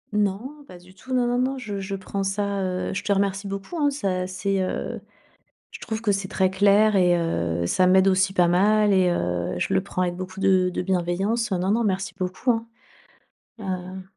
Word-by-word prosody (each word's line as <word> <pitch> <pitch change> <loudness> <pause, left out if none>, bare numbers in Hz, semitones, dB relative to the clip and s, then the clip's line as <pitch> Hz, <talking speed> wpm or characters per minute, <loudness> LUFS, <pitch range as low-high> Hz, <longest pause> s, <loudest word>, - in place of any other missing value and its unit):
Non, 215 +9 -2
pas 180 - -12
du 180 +1 -18
tout, 225 +7 -13
non, 250 -1 +2
non, 245 +1 0
non, 265 +1 0
je 210 -5 -5
je 195 0 -4
prends 195 +1 -4
ça, 200 0 -1
heu, 185 0 -2
je 190 - -2
te - - -2
remercie 200 0 0
beaucoup 195 - -6
hein. 290 -1 +3
Ça 185 -10 -2
c'est, 190 +1 -1
heu, 185 - -3 0.7
je - - -10
trouve 220 0 -4
que 210 - +1
c'est 195 -1 -1
très 190 -1 +1
clair 205 +2 +4
et 180 -2 +4
heu, 85 - -1
ça 185 - +2
m'aide 190 +1 +5
aussi 190 0 +2
pas 180 -3 +4
mal 205 +4 +3
et 185 -2 +4
heu, 90 - -1
je - - -1
le 190 - +3
prends 185 -2 -3
avec 175 -1 0
beaucoup 185 +1 -7
de 185 -1 +3
de - - -1
bienveillance, 190 +5 -1
hein. 180 - 0
Non, 185 - -1
non, 230 +3 +2
merci 190 -2 -1
beaucoup, 185 +6 -3
hein, 225 0 -2 0.9
heu 185 -1 -5
195 Hz, 210 wpm, -24 LUFS, 185-205 Hz, 0.9 s, m'aide